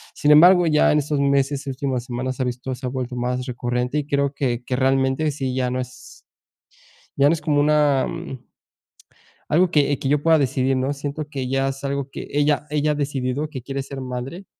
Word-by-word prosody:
Sin 150 - +2
embargo, 175 +3 +7
ya 150 -1 +4
en 150 - +3
estos 145 0 -1
meses 140 0 +1
y - - -1
últimas 130 -2 -3
semanas 130 +1 -4
ha - - +1
visto 125 +1 -4
se 130 +1 -8
ha - - -2
vuelto 125 -1 -4
más 125 +1 -2
recurrente 125 +2 -2
y 145 - -5
creo 140 -1 0
que 125 -4 -2
que 125 - -2
realmente 135 +3 +1
sí 135 -2 -3
ya 125 -1 0
no 130 - -2
es 125 0 -12 0.9
ya 140 +1 +5
no - - +3
es 155 - -5
como 150 -2 +1
una, 145 -2 +3
mm, 130 -2 -7 1.1
algo 175 +3 +3
que 145 -2 +2
que 135 - -3
yo 145 0 +1
pueda 165 -2 +5
decidir, 130 -1 +1
¿no? 135 +2 0
Siento 145 +2 -5
que 135 -3 -4
ya 135 0 +1
es 135 +1 -7
algo 140 0 -2
que - - -7
ella 145 0 +1
ella 150 0 +1
ha - - -1
decidido 140 0 -2
que 130 -5 -7
quiere 135 0 -4
ser 135 0 -8
madre 130 +9 -6
135 Hz, 215 wpm, -22 LUFS, 130-145 Hz, 1.1 s, embargo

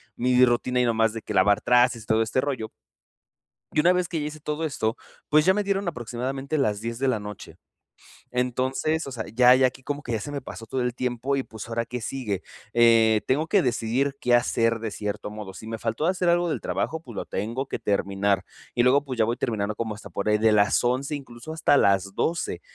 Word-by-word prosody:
mi 125 +1 +4
rutina 125 +1 +1
y - - +2
no 115 - +2
más 110 0 +2
de 115 - -5
que - - -5
lavar 100 0 +4
trastes 125 -2 +3
y - - -16
todo 110 0 +3
este 110 +4 -1
rollo 130 -6 -3 1.0
y - - +3
una 180 +3 +5
vez 180 -2 0
que 165 - -2
ya 150 - -2
hice 155 0 -7
todo 150 +2 -3
esto, 115 -7 -1 0.3
pues, 150 +1 +4
ya 190 - +5
me 210 +1 0
dieron 200 -1 -1
aproximadamente 135 +2 -3
las 105 -7 0
10 115 +1 -4
de 135 - 0
la 115 -5 +1
noche. 105 -1 -9 0.8
Entonces, 130 +5 0
o 135 - -7
sea, 115 -4 -5
ya 125 +2 +6
ya 130 0 +5
aquí 130 +1 -8
que - - -31
como 145 +1 -3
que 120 - -6
ya 110 - 0
se 145 +8 -6
me 140 - -4
pasó 115 -2 -9
todo 130 +3 -2
el 125 0 -1
tiempo 125 +2 -1
y 135 - -1
pues, 110 0 -9
ahora 115 0 -1
qué 125 -1 -5
sigue. 110 -7 -3 0.3
Eh, 115 -2 +5
tengo 145 +5 +2
que 195 +1 +3
decidir 125 +2 0
qué 125 - +1
hacer 115 -1 +2
de 110 -1 -3
cierto 105 0 -4
modo. 105 -2 -8
Si 110 +4 -10
me 115 0 -4
faltó 115 +9 -1
hacer 180 -1 +1
algo 175 0 +2
del - - -2
trabajo, 160 - -2
pues, 120 -9 -12
lo - - -4
tengo 120 +7 -3
que - - -3
terminar, 100 -1 0 0.3
y 120 - +2
luego 140 +3 +4
pues, 130 -3 -5
ya 110 - +5
voy 120 +2 -1
terminando 105 -3 -2
como 110 0 -3
hasta 105 - -11
por 100 +2 -2
ahí 105 - +4
de 110 0 +4
las 105 +3 +3
11, 130 +4 0
incluso 135 +2 -9
hasta 150 -3 +3
las 100 -2 +2
12, 170 +1 -1
125 Hz, 235 wpm, -25 LUFS, 110-140 Hz, 1.0 s, ya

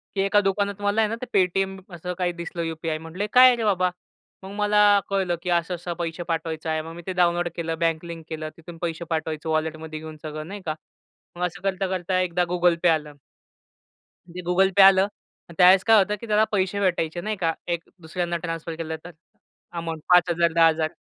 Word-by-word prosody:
की 195 - +1
एका 200 +1 +3
दुकानात 200 +1 -1
मला 205 +2 +2
आहे 215 - +2
ना, 230 - -2
ते - - -3
पेटीएम 190 0 +1 0.2
असं 180 +2 -5
काही 180 -1 0
दिसलं 170 0 -6
यूपीआय. 160 -1 -3
म्हटलं, 165 +4 -8
"हे - - -1
काय 255 +1 +9
आहे 250 - +5
रे 230 - -3
बाबा?" 185 -3 +2 0.5
मग 190 - -8
मला 210 -1 +4
कळलं, 190 -3 0
की 180 - -4
असं-असं 175 0 -1
पैसे 170 0 -3
पाठवायचं 160 -1 -3
आहे. 160 0 0
मग 165 +1 -9
मी 175 - -8
ते 185 - -2
डाऊनलोड 175 -1 +2
केलं, 165 -1 -3
बँक 165 0 0
लिंक 165 -1 -8
केलं. 155 -1 -5
तिथून 165 0 -11
पैसे 170 0 -3
पाठवायचे 160 -1 -3
वॉलेटमध्ये 155 0 -2
घेऊन 155 0 -9
सगळं 155 0 -6
नाही 200 +1 -7
का. 155 - -2 0.6
मग 180 - -4
असं 180 +2 -6
करता-करता 185 -1 -1
एकदा 180 -1 0
Google 175 -1 +3
Pay 170 - +7
आलं. 150 -1 -4 1.2
ते 180 +2 -7
Google 190 +2 +3
Pay 195 - +9
आलं 195 0 +5 0.4
अन् 170 - -12
त्यावेळेस 185 +1 +7
काय 225 -1 +6
होतं, 210 +1 +2
की 230 - -7
त्याला 210 0 +3
पैसे 195 -1 0
भेटायचे 175 -3 0
नाही 215 +3 -2
का. 165 -3 0
एक 170 -1 -2 0.2
दुसऱ्यांना 170 +1 -3
ट्रान्सफर 165 0 -4
केलं 160 -1 -4
तर 175 - -8 0.7
अमाउंट. 165 -1 -5
5,000, 170 -2 +4
10,000 160 -1 +3
175 Hz, 200 wpm, -24 LUFS, 165-195 Hz, 1.2 s, काय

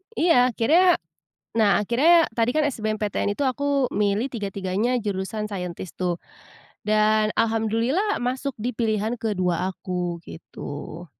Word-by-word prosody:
Iya 255 -7 +4
akhirnya 340 - +4 0.6
nah 210 -2 +3
akhirnya 315 - +4
tadi 230 +1 +2
kan 310 - +3
SBMPTN 215 -4 -1
itu 285 - -3
aku 275 0 +1
milih 210 +5 0
tiga-tiganya 200 +2 -1
jurusan 210 +1 -3
scientist 180 -2 -6
tuh 180 -2 0 0.7
dan 215 0 +3
alhamdulillah 230 - +1
masuk 260 +3 -2
di 240 +2 -3
pilihan 220 0 0
ke-2 185 -4 0
aku, 180 -2 -4
gitu. 160 +1 -8
215 Hz, 120 wpm, -24 LUFS, 195-250 Hz, 0.7 s, Iya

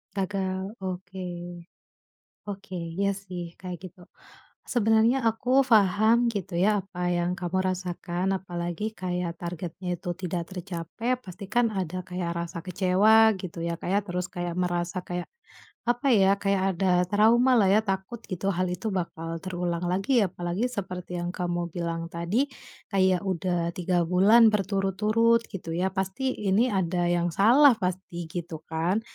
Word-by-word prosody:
Gagal, 190 +1 -2
oke, 185 0 -5 1.3
oke 195 -1 -8 0.2
ya 200 0 +2
sih 180 -3 -7
kayak 180 -2 -6
gitu. 185 -1 -12 0.7
Sebenarnya 225 +2 +4
aku 250 +4 +3
paham 220 +1 +4
gitu 195 -5 -4
ya 185 +5 +3 0.2
apa 180 -2 -3
yang 175 0 0
kamu 180 0 -3 0.2
rasakan, 180 +1 -2
apalagi 175 +3 -4
kayak 180 -3 -3
targetnya 175 +1 -4
itu 180 0 -6
tidak 175 -1 -2
tercapai, 185 +7 -3
pastikan 215 +2 -1
ada 185 -1 -3
kayak 175 -2 -3
rasa 170 -1 -7
kecewa 200 +5 +4
gitu 170 -2 -5
ya 170 - -1
Kak - - -4
ya, 200 +2 +3
terus 180 -1 -2
kayak 175 -1 -4
merasa 175 0 -1
kayak, 175 0 -4 0.6
apa 245 +3 +1
ya, 195 -2 +5
kayak 195 -1 +1
ada 185 0 +2 0.2
trauma 230 +5 +4
lah 195 -3 +4
ya, 210 +3 +5
takut 195 +4 -3
gitu 185 +1 -3
hal 185 -1 0
itu 200 +5 -3
bakal 165 -3 -3
terulang 175 -1 -2
lagi 225 +6 +2
apalagi 180 +5 -2
seperti 180 -5 -5
yang 175 - -3
kamu 175 -1 -2
bilang 170 -1 -3
tadi, 180 +12 0 0.4
kayak 185 -2 +3
udah 175 -2 -1
3 175 -1 +1
bulan 215 +6 +6
berturut-turut 210 +4 +2
gitu 170 -4 -5
ya, 185 +2 +1
pasti 195 +8 -1 0.2
ini 225 +7 +4
ada 175 -2 0
yang 175 0 +1
salah 245 - +6
pasti 180 -2 -3
gitukan. 165 +3 -2
185 Hz, 140 wpm, -27 LUFS, 175-205 Hz, 1.3 s, bulan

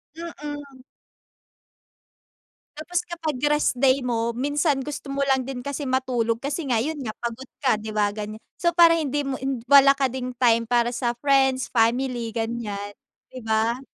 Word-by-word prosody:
Mm. 290 -5 -8 2.0
Tapos 345 +3 -2
kapag 320 -5 -3
rest 295 -2 +2
day 260 -1 +3
mo, 235 -1 -1
minsan 290 +2 +1
gusto 290 -1 -6
mo 275 0 0
lang 265 -1 +2
din 250 -1 -6
kasi 280 +1 -4
matulog 245 -3 0
kasi 280 +6 -3
nga 240 - +3
yun 290 +6 -2
nga 245 - -4
pagod 235 +2 -6
ka, 265 -5 +2
di 220 - -6
ba, 210 -1 0
ganyan. 215 0 -6 0.2
So 345 - +4
para 335 -1 +8
hindi 290 -3 -1
mo 275 - -2 0.3
wala 275 +1 +7
ka 275 - +2
ding 255 0 -3
time 230 -2 +3
para 240 0 +2
sa 240 -1 -2
friends, 265 -1 +2
family 240 0 +1
ganyan, 220 -3 -4 0.4
di 255 - -7
ba? 225 +3 0
260 Hz, 160 wpm, -24 LUFS, 235-280 Hz, 2.0 s, para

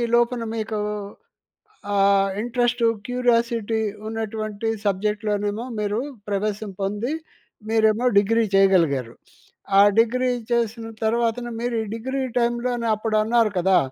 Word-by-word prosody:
లోపల 240 0 +2
మీకు 220 -1 -3 1.1
ఆహ్, 195 0 +4
ఇంట్రెస్ట్, 245 +1 0 0.2
క్యూరియాసిటీ 235 -3 +1 0.3
ఉన్నటువంటి 220 -1 -4 0.2
సబ్జెక్ట్‌లోనేమో 210 +2 -1
మీరు 210 +1 -1 0.3
ప్రవేశం 205 +1 -2
పొంది, 210 +8 -2 0.6
మీరేమో 220 +1 +3
డిగ్రీ 225 +3 +2
చేయగలిగారు. 165 -11 +3 0.7
ఆ - - +9 0.2
డిగ్రీ 250 +3 +2 0.2
చేసిన 230 -1 0 0.2
తర్వాతన 235 +1 0
మీరు 240 0 -1
ఈ - - -7
డిగ్రీ 260 +4 -3 0.2
టైమ్‌లోనే 240 0 0
అప్పుడు 215 +1 -2
అన్నారు 225 -1 +2
కదా! 190 +1 +4
225 Hz, 105 wpm, -23 LUFS, 205-235 Hz, 1.1 s, ఆ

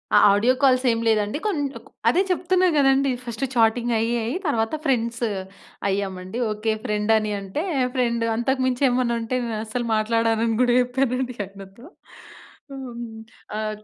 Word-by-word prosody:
ఆ! - - +8 0.2
ఆడియో 225 +5 +3
కాల్సేమి 255 -3 +3
లేదండి. 215 +2 +1
కొన్నింటకు 290 -9 -3 0.2
అదే 365 - +3
చెప్తున్నా 365 +1 +2
గదండీ, 270 -1 +4
ఫస్టు 235 +3 -3
చాటింగయ్యి, 230 0 +2
అయ్యి, 235 +10 -2
తరవాత 225 -1 0
ఫ్రెండ్స్ 235 -3 0 0.6
అయ్యామండి. 190 +1 -3
ఓకే. 215 +1 -1
ఫ్రెండని 215 -1 +1
అంటే, 195 - -4 0.3
ఫ్రెండు. 235 -2 +1
అంతకు 260 +3 0
మించేమన్నుంటే, 250 -2 +1
నేనస్సలు 225 +2 -3
మాట్లాడనని 225 +1 +1
గూడా 245 -1 +3
చెప్పానండి. 250 0 -1
ఆయనతో 195 +4 -13 0.9
హ్మ్. 240 -4 -7 0.5
ఆది 215 -1 -4
235 Hz, 115 wpm, -23 LUFS, 220-255 Hz, 0.9 s, ఆ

